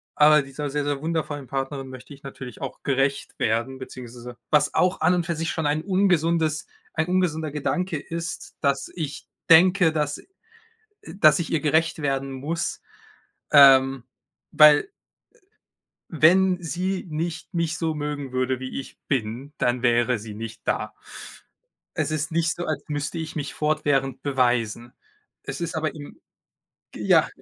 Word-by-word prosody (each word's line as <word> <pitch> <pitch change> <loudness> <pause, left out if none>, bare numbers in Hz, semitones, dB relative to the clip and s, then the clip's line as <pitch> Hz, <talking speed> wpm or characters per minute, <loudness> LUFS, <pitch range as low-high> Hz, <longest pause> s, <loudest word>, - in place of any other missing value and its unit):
aber 150 0 +6
dieser 140 +2 -5
sehr, 145 +1 -2
sehr 145 -1 -2
wundervollen 155 -4 -3
Partnerin 135 0 -4
möchte 130 +2 -11
ich 140 - -16
natürlich 130 -3 -9
auch - - -6
gerecht 135 0 -1
werden, 115 +4 -1
beziehungsweise 125 -1 -9
was 150 -1 +3
auch 180 +1 +2
an 180 +3 +4
und 175 -2 -1
für 170 - -1
sich 165 +1 -2
schon 160 -3 -1
ein 150 +1 0
ungesundes 170 -5 +1 0.3
ein 160 +1 0
ungesunder 160 -5 0
Gedanke 170 +4 -2
ist, 165 +2 -6
dass 140 -2 0
ich 150 -4 -5 0.2
denke, 175 +1 +6
dass, 150 -2 -1
äh, - - -16 0.9
dass 155 -6 +6
ich 170 - -4
ihr 160 - +2
gerecht 160 +2 +1
werden 135 -1 -1
muss. 150 +6 -3 0.7
Ähm, 135 -2 +7 0.5
weil, 150 -1 +8
äh, - - -9 1.2
wenn 180 +3 +4
sie 185 +3 -2
nicht 165 +4 -4
mich 165 -2 -1
so 160 -2 -1
mögen 145 -2 -4
würde, 130 0 -1
wie 130 0 -5
ich - - -12
bin, 130 +3 -2
dann 125 -2 0
wäre 120 0 +2
sie 105 0 -9
nicht 110 +1 -7
da. - - -1 1.0
Es - - 0
ist 155 0 -2
nicht 165 0 +1
so, 175 - -5
als 150 -3 -3
müsste 145 +2 -3
ich 160 -1 -5
mich 145 -2 -4
fortwährend 140 -4 0
beweisen. 120 -3 0 0.5
Es - - -6
ist 170 -1 -3
aber 155 -1 -2
im 145 -2 -11 0.8
ja. - - +3
150 Hz, 155 wpm, -24 LUFS, 135-160 Hz, 1.2 s, weil